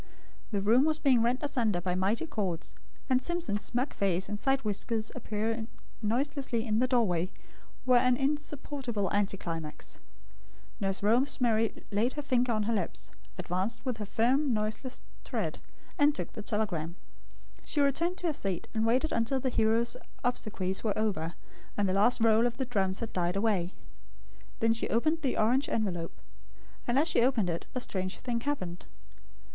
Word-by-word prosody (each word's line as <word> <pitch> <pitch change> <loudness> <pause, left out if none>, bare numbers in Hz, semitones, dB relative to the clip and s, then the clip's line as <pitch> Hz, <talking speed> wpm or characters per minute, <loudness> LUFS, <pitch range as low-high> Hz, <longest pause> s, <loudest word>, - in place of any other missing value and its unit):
The 200 -3 -1
room 235 +7 +5
was 310 0 +2
being 265 -6 +4
rent 240 +2 +1
asunder 235 -10 +1
by 180 0 -1
mighty 195 - +1
chords; 190 - -3 0.3
and 255 -1 +3
Simpson's 345 -10 -1
smug 245 +6 0
face 190 -1 0
and 205 0 -4
side 270 +2 +2
whiskers 215 +1 -1
appearing 220 +1 -2 0.3
noiselessly 245 +1 0
in 215 -1 +1
the 255 - +3
doorway, 185 -9 +2 0.6
were 250 -1 +6
an 250 0 +4
insupportable 275 -6 -2
anticlimax. 170 -6 -2 0.8
Nurse 195 -1 -1
Rosemary 230 -1 +2
laid 220 +5 +1
her 295 - -4
finger 250 -3 +2
on 215 -2 +1
her 230 +2 0
lips; 100 - -2 0.3
advanced 190 +9 -2
with 250 -3 -1
her 210 - -4
firm 260 +7 +2
noiseless 215 +5 -3 0.2
tread, - - -2 0.4
and 290 0 +5
took - - -5
the 215 - -6
telegram. 195 -7 -2 0.7
She 300 - -2
returned 325 +6 +2
to 360 - -5
her 325 - +2
seat 195 -9 -3
and 220 0 +1
waited 255 +7 +2
until 230 +4 +1
the 260 - 0
hero's 230 +1 +2 0.3
obsequies 200 -6 -1
were 215 -3 0
over, 185 -6 -1 0.4
and 205 -1 +2
the 185 - +1
last 215 +5 +4
roll 225 +1 +5
of 240 - -5
the 265 - -1
drums 195 -6 0
had 230 - -4
died 175 0 0
away. 195 -4 +1 0.9
Then 225 0 +4
she 230 - -1
opened 310 +8 +2
the 270 -4 0
orange 250 +6 +3
envelope. 175 -7 -2 0.7
And 240 +2 +2
as 300 +4 +4
she 320 - +3
opened 235 -8 +2
it, 170 - -4
a - - +1
strange 185 -6 -3
thing 240 -2 -2
happened. 185 -11 -3
225 Hz, 165 wpm, -30 LUFS, 200-255 Hz, 0.9 s, were